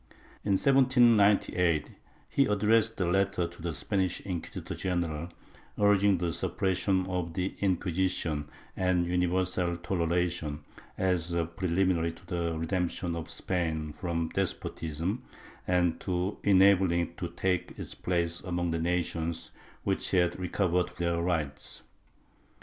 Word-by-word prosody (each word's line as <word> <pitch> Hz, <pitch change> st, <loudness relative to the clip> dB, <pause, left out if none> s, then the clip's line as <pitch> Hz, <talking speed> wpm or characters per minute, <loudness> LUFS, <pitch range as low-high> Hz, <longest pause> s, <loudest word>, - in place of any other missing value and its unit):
In 100 Hz, -, +1 dB
1798, 110 Hz, -, +4 dB, 0.4 s
he 140 Hz, -, +3 dB
addressed 110 Hz, +2 st, +2 dB
a 90 Hz, -, +2 dB
letter 95 Hz, 0 st, +1 dB
to 85 Hz, 0 st, -13 dB
the 85 Hz, 0 st, -2 dB
Spanish 95 Hz, +5 st, -1 dB
inquisitor 90 Hz, -4 st, -5 dB
general, 85 Hz, -3 st, -2 dB, 0.5 s
urging 100 Hz, -1 st, +4 dB
the 85 Hz, -1 st, -1 dB
suppression 95 Hz, +2 st, 0 dB
of 90 Hz, -3 st, -3 dB
the 95 Hz, +1 st, -2 dB
Inquisition 90 Hz, -5 st, 0 dB, 0.3 s
and 90 Hz, -2 st, +2 dB
universal 90 Hz, 0 st, 0 dB
toleration, 85 Hz, -3 st, -1 dB, 0.4 s
as 90 Hz, -2 st, 0 dB
a 85 Hz, -1 st, +1 dB
preliminary 85 Hz, 0 st, 0 dB
to -, -, -15 dB
the 85 Hz, -2 st, -2 dB
redemption 85 Hz, +1 st, -1 dB
of 80 Hz, -1 st, -5 dB
Spain 80 Hz, -4 st, -2 dB
from 85 Hz, -1 st, -2 dB
despotism, 90 Hz, +1 st, -2 dB, 0.5 s
and 90 Hz, -2 st, +2 dB
to 90 Hz, +2 st, -2 dB
enabling 95 Hz, -3 st, +5 dB
it 85 Hz, 0 st, -5 dB
to 90 Hz, -, -2 dB
take 90 Hz, +1 st, -2 dB
its -, -, -5 dB
place 85 Hz, -1 st, -1 dB
among 90 Hz, -2 st, -2 dB
the 80 Hz, -, -1 dB
nations 85 Hz, -1 st, -1 dB, 0.3 s
which -, -, -1 dB
had 90 Hz, -1 st, +2 dB
recovered 90 Hz, 0 st, 0 dB
their 85 Hz, -1 st, 0 dB
rights. 80 Hz, -5 st, -2 dB
90 Hz, 120 wpm, -29 LUFS, 85-95 Hz, 0.5 s, enabling